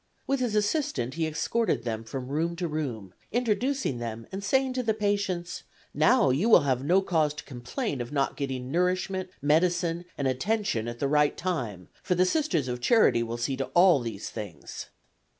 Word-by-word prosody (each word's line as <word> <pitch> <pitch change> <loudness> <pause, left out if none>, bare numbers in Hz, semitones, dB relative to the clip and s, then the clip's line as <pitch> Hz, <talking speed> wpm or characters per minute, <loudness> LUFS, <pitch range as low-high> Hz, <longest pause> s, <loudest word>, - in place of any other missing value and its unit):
With 275 0 0
his 240 -4 -1
assistant 210 - 0
he 160 0 -1
escorted 155 - 0
them 115 -2 -3
from 125 +3 -6
room 165 +4 -1
to 175 0 -2
room, 125 - -4 0.2
introducing 245 - 0
them 115 -1 -5
and 195 +1 -5
saying 265 +5 +2
to 255 - -1
the 225 -3 0
patients: 200 -4 -1 0.3
"Now 250 - +4
you 165 - +1
will 215 - +8
have 130 -2 0
no 185 +6 +3
cause 155 -5 +1
to 150 - -7
complain 135 - -4
of 120 - -6
not 140 -2 0
getting 130 -2 -4
nourishment, 185 +2 0
medicine 170 +3 +2
and 140 - 0
attention 130 - 0
at 120 0 -5
the 140 - 0
right 150 +1 +2
time, 120 - -3
for 180 - 0
the 180 +1 +4
Sisters 185 - +1
of 125 0 -4
Charity 220 - +4
will 115 0 -3
see 125 +3 -1
to 135 - -1
all 175 -3 +6
these 115 -5 -5
things." 100 -9 -7
160 Hz, 185 wpm, -27 LUFS, 125-200 Hz, 0.3 s, will